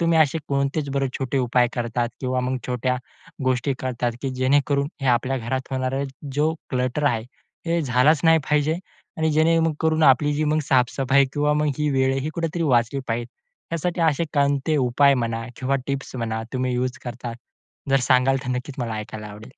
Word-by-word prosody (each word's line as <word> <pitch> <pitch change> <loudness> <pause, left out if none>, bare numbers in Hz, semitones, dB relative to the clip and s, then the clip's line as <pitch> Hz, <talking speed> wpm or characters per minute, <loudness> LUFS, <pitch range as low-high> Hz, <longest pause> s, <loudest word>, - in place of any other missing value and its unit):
तुम्ही 165 -1 +3
असे 155 0 +3
कोणतेच 140 +1 0
बरे 135 0 0
छोटे 135 0 -1
उपाय 125 -1 +2
करतात 120 0 -1
किंवा 130 -1 0 0.3
छोट्या 125 0 0 0.5
गोष्टी 130 +2 +1
करतात, 120 -2 -2
की 135 - -1
जेणेकरून 140 +2 +2
हे - - -1
आपल्या 125 +2 +2
घरात 130 +3 -3
होणारा 130 +1 -1 0.3
जो 155 +3 +2 0.2
क्लटर 130 +3 -1
आहे 115 -4 -1 0.4
हे 170 0 +1
झालंच 135 +3 +3
नाही 165 0 +6
पाहिजे? 150 +1 +2 0.4
आणि 160 0 +2
जेणेकरून 160 0 +2
आपली 145 +1 +5
जी 155 +1 0 0.2
साफ-सफाई 135 +2 +3
किंवा 150 0 +1 0.3
ही 150 0 +1
वेळही 135 +1 +1
कुठेतरी 170 0 -2
वाचली 125 -2 +2
पाहिजे 115 +1 -1 0.5
यासाठी 170 +1 -1
असे 160 0 +2
कोणते 140 +1 +2
उपाय 140 +1 +4
म्हणा 115 -2 -2
किंवा 135 +1 0
टिप्स 140 -1 -4
म्हणा 110 -2 -2
तुम्ही 130 -1 -1
युज 125 0 -2
करता? 120 -1 -5 0.6
जर 135 - +5
सांगाल 130 +1 +3
तर - - -5
नक्कीच 125 +2 -4
मला 115 -3 -2
ऐकायला 105 0 -6
आवडेल. 105 +3 -11
135 Hz, 160 wpm, -23 LUFS, 125-150 Hz, 0.6 s, नाही